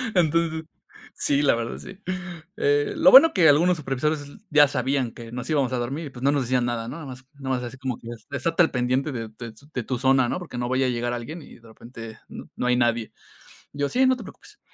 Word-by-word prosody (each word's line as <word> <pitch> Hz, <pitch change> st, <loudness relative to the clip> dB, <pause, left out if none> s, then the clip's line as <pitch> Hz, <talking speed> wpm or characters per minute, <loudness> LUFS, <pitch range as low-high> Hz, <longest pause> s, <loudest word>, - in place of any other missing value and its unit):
Entonces 165 Hz, -1 st, +1 dB, 0.5 s
sí, 140 Hz, 0 st, +1 dB
la 140 Hz, -, +4 dB
verdad 115 Hz, 0 st, -4 dB
sí. 195 Hz, +1 st, -11 dB, 0.6 s
Eh, 145 Hz, 0 st, +1 dB
lo 180 Hz, -, +6 dB
bueno 300 Hz, +5 st, +9 dB
que 175 Hz, -4 st, +5 dB
algunos 170 Hz, +4 st, +4 dB
supervisores 150 Hz, +2 st, -1 dB
s 145 Hz, 0 st, -12 dB
ya 150 Hz, -2 st, +6 dB
sabían 130 Hz, -2 st, -1 dB
que 115 Hz, -1 st, -11 dB
nos 125 Hz, +5 st, -6 dB
íbamos 135 Hz, -5 st, +1 dB
a -, -, 0 dB
dormir, 140 Hz, +6 st, -3 dB
y, -, -, -8 dB
pues, 125 Hz, -1 st, -11 dB
no 140 Hz, -, +4 dB
nos 140 Hz, -3 st, +1 dB
decían 125 Hz, 0 st, +1 dB
nada, 115 Hz, -1 st, -3 dB
¿no? 130 Hz, -, -6 dB
Nada 165 Hz, -3 st, -8 dB
más 130 Hz, 0 st, -10 dB
nomás 130 Hz, -2 st, -2 dB
así 120 Hz, +2 st, -7 dB
como 130 Hz, -3 st, -4 dB
que: 115 Hz, -, -10 dB, 0.2 s
"Estate 155 Hz, +6 st, +1 dB
al -, -, +1 dB
pendiente 130 Hz, +3 st, 0 dB
de 115 Hz, -3 st, -5 dB
de 110 Hz, +1 st, -9 dB, 0.2 s
de 125 Hz, -, -2 dB
tu 125 Hz, +1 st, -3 dB
zona", 130 Hz, -1 st, +3 dB
¿no? -, -, -1 dB
Porque 160 Hz, -8 st, -8 dB
no 120 Hz, 0 st, -2 dB
vaya 130 Hz, +1 st, +1 dB
a -, -, +1 dB
llegar 120 Hz, 0 st, -2 dB
alguien, 150 Hz, +8 st, -6 dB
y -, -, -14 dB
de 115 Hz, -, -18 dB
repente, 115 Hz, 0 st, -11 dB
no 125 Hz, -, -6 dB
hay 125 Hz, -, +3 dB
nadie. 120 Hz, -2 st, 0 dB, 0.6 s
Yo: 145 Hz, 0 st, -1 dB
"Sí, 260 Hz, +1 st, +3 dB
no 260 Hz, 0 st, +4 dB
te 240 Hz, -, -9 dB
preocupes". 420 Hz, -, -14 dB
130 Hz, 235 wpm, -24 LUFS, 120-150 Hz, 0.6 s, bueno